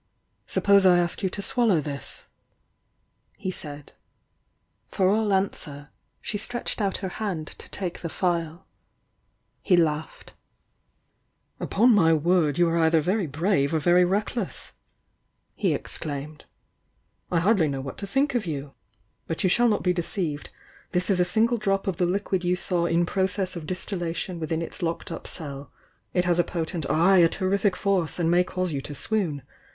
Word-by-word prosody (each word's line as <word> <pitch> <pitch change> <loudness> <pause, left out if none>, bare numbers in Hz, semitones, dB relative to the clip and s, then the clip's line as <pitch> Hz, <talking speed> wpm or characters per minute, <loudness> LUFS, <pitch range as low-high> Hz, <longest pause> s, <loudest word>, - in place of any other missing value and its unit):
"Suppose 200 -1 +4
I 180 -2 +6
ask 175 +2 0
you 190 - +1
to 200 +2 -5
swallow 225 -8 +2
this?" 140 -2 -5 1.1
he 185 - -3
said. 145 -5 -9 0.9
For 190 - +1
all 215 +1 +2
answer, 150 -7 -2 0.3
she 205 - -3
stretched 240 +1 -3
out 195 -2 0
her 185 - -6
hand 180 -8 -2
to - - -11
take 180 -3 -5
the 170 - -4
phial. 170 0 -2 1.0
He 180 - +3
laughed. 160 -2 -1 1.3
"Upon 235 +4 +3
my 165 -6 +5
word, 160 -1 +2
you 175 -1 +4
are 165 0 +1
either 160 0 +4
very 185 +4 0
brave 155 0 +1
or - - +2
very 175 +4 +4
reckless!" 200 +3 -2 0.8
he - - 0
exclaimed 150 0 -5 0.4
— - - -43
"I 175 - +3
hardly 185 -2 +3
know 135 -2 -3
what 135 0 -7
to 200 - -4
think 275 +6 +1
of 230 -6 -1
you! 140 -3 -4 0.5
But 165 - -2
you 185 - +3
shall 240 +4 +4
not 210 - 0
be 180 - +3
deop'ved. 170 -4 -3 0.5
This 180 +2 +1
is 185 - +2
a 180 - +4
single 230 +5 +2
drop 195 -2 0
of 190 -4 -2
the 180 - +2
liquid 190 0 -1
you 180 +1 +2
saw 175 -1 0
i. 170 +1 +2
process 190 0 -1
of 160 -3 -6
distillation 180 -1 -3
within 160 +1 -2
its - - -7
locked 165 -1 -3
up - - -6
cell. 140 -3 -8 0.4
f 180 - +3
has 175 -1 +2
a - - +5
po 170 -1 -3
tent, 160 -4 -3
ay, 170 +6 +5
a 165 -1 +6
terrific 195 +1 +1
force 190 -6 0
and 170 -1 +1
may 175 +1 +5
caust 185 -2 -3
ou 140 - -2
to 145 - -7
swoon. 170 -5 -1
175 Hz, 170 wpm, -25 LUFS, 160-195 Hz, 1.3 s, I